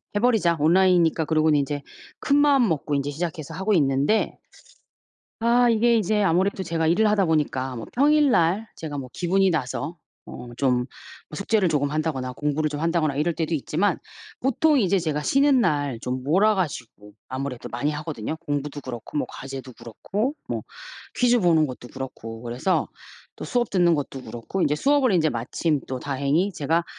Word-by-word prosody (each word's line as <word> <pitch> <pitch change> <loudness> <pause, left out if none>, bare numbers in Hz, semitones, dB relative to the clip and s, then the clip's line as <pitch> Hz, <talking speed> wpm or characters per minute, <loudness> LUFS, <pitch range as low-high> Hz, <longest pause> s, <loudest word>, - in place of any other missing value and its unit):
해 - - +2
버리자. 210 -8 +2
온라인이니까 170 0 +3
그러고는 155 -1 +3
인제 145 0 -3 0.4
큰마음 280 -3 +4
먹고 150 -2 -1
인제 140 +1 -1
시작해서 165 0 -5
하고 190 +5 0
있는데 145 +5 +1 1.0
아 240 +2 +4
이게 235 +1 +3
인제 210 0 +1
아무래도 190 +1 +1
제가 165 -2 -1
일을 185 +7 +3
하다 200 -3 +2
보니까 135 -5 -1
뭐 115 - -6
평일 295 +2 +4
날 185 +2 +2
제가 155 -3 -6
뭐 130 -3 -6
기분이 190 +2 +2
나서 160 +2 -3 0.3
어 120 - -9
좀 125 -2 +1 0.5
숙제를 200 +2 +1
조금 145 -3 0
한다거나 150 -4 -2
공부를 150 +3 -1
좀 145 0 -4
한다거나 165 -3 +1
이럴 160 +4 0
때도 160 0 -2
있지만 160 +7 0 0.4
보통 285 +3 +2
이제 195 -2 +2
제가 155 -4 -2
쉬는 275 - +3
날 145 - 0
좀 125 +2 -3
몰아 195 +9 +3
가지고 120 - -5 0.2
아무래도 130 -1 -5
많이 140 +5 -1
하거든요. 150 -3 -4
공부도 145 -2 -4
그렇고 125 +2 -6
뭐 - - -1
과제도 135 -1 -8
그렇고 195 - -3
뭐 - - -3 0.5
퀴즈 245 0 +3
보는 165 -4 +4
것도 125 -2 -9
그렇고 115 -4 -8
그래서 125 +10 -1 0.5
또 - - -7
수업 240 -2 0
듣는 175 -3 +3
것도 140 -3 -4
그렇고 120 +11 -4
인제 150 -2 +2
수업을 275 - +3
인제 165 -4 +3
마침 145 +5 -1
또 130 - -4
다행히 140 +8 0
제가 165 +2 0
160 Hz, 365 characters per minute, -24 LUFS, 140-195 Hz, 1.0 s, 큰마음